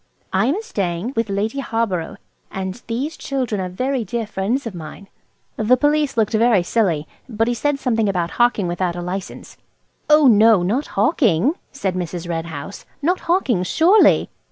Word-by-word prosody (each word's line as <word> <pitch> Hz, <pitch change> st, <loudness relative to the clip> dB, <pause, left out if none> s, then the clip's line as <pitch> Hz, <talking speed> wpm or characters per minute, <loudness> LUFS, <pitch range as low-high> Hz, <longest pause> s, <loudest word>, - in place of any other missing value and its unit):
I 195 Hz, +5 st, +2 dB
am 360 Hz, +12 st, 0 dB
staying 190 Hz, -, -3 dB
with 230 Hz, -1 st, -1 dB
Lady 210 Hz, +7 st, -2 dB
Harborough, 225 Hz, -10 st, -2 dB, 0.3 s
and 190 Hz, +4 st, -5 dB
these 265 Hz, +7 st, -3 dB
children 250 Hz, -7 st, -2 dB
are 185 Hz, -, -3 dB
very 255 Hz, +7 st, -2 dB
dear 225 Hz, +3 st, -3 dB
friends 215 Hz, +6 st, -2 dB
of 230 Hz, -, -5 dB
mine." 175 Hz, +4 st, -10 dB, 0.5 s
The 230 Hz, +4 st, +3 dB
Police 295 Hz, -1 st, +1 dB
looked 220 Hz, 0 st, +1 dB
very 220 Hz, -4 st, +3 dB
silly, 175 Hz, -7 st, 0 dB, 0.2 s
but 225 Hz, -1 st, 0 dB
he 240 Hz, -, +1 dB
said 290 Hz, +5 st, 0 dB
something 225 Hz, -6 st, 0 dB
about 175 Hz, -3 st, -1 dB
hawking 240 Hz, -6 st, +2 dB
without 175 Hz, 0 st, -2 dB
a 175 Hz, -, -4 dB
license 185 Hz, +2 st, -6 dB, 0.5 s
"Oh 300 Hz, 0 st, +6 dB
no, 220 Hz, -5 st, +6 dB
not 240 Hz, +11 st, -1 dB
hawking," 220 Hz, -, +3 dB, 0.2 s
said 200 Hz, -9 st, -2 dB
Mrs. 175 Hz, -1 st, -4 dB
Red 165 Hz, -1 st, -3 dB
House, 160 Hz, +4 st, -8 dB, 0.2 s
"not 360 Hz, +4 st, +1 dB
hawking 275 Hz, -, +2 dB
surely! 340 Hz, -, +4 dB
220 Hz, 165 wpm, -20 LUFS, 185-255 Hz, 0.5 s, Oh